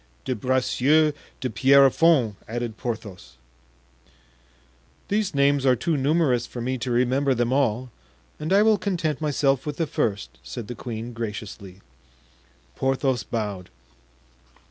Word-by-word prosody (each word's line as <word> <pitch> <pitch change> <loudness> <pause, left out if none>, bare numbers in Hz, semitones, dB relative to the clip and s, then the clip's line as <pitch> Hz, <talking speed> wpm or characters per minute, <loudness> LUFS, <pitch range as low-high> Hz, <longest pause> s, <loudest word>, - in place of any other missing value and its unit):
"De 130 - 0
Bracieux 130 +5 +2 0.3
de 130 - -1
Pierrefonds," 135 0 +4
added 120 -1 -4
Porthos. 110 -6 -6 1.8
"These 205 -5 0
names 140 0 +3
are 130 -2 +4
too 165 +6 -1
numerous 135 -4 +1
for 125 - -8
me 130 +2 -2
to 120 - -3
remember 130 +3 +2
them 120 +1 0
all, 130 -2 0 0.5
and 155 +3 -4
I 200 +2 +5
will 215 -2 +4
content 165 -8 -2
myself 140 -3 +1
with 150 -1 -5
the 165 - 0
first," 105 -8 -3
said 120 -4 -7
the 120 - -5
queen, 115 0 -6
graciously. 105 -4 -7 0.9
Porthos 135 -2 0
bowed. 105 -5 -4
130 Hz, 125 wpm, -24 LUFS, 115-145 Hz, 1.8 s, I